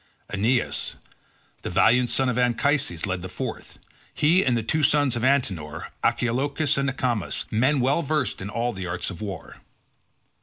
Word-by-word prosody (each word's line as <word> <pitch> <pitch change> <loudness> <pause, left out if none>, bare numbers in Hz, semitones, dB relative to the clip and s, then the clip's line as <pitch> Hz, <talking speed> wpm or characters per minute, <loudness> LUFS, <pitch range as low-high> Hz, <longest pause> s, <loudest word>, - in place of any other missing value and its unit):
Aeneas, 115 +5 0 0.7
the - - -4
valiant 120 +7 +4
son 135 - +1
of 125 - 0
Anchises, 125 - +1
led 90 -2 -2
the 95 - -6
fourth; - - -6 0.4
he 165 +5 +4
and 125 -3 +2
the 115 - -1
two 155 +8 0
sons 145 -3 +3
of 120 - -3
Antenor, 100 - 0
Archelochus 140 +5 +1
and 140 0 +1
Acamas, 125 -5 -1
men 130 +6 +2
well 135 +6 +2
versed 150 - -1
in 95 - -5
all 120 +3 -1
the 95 -2 -5
arts 85 +2 -2
of 90 - -9
war. 95 -7 -7
125 Hz, 160 wpm, -25 LUFS, 100-140 Hz, 0.7 s, valiant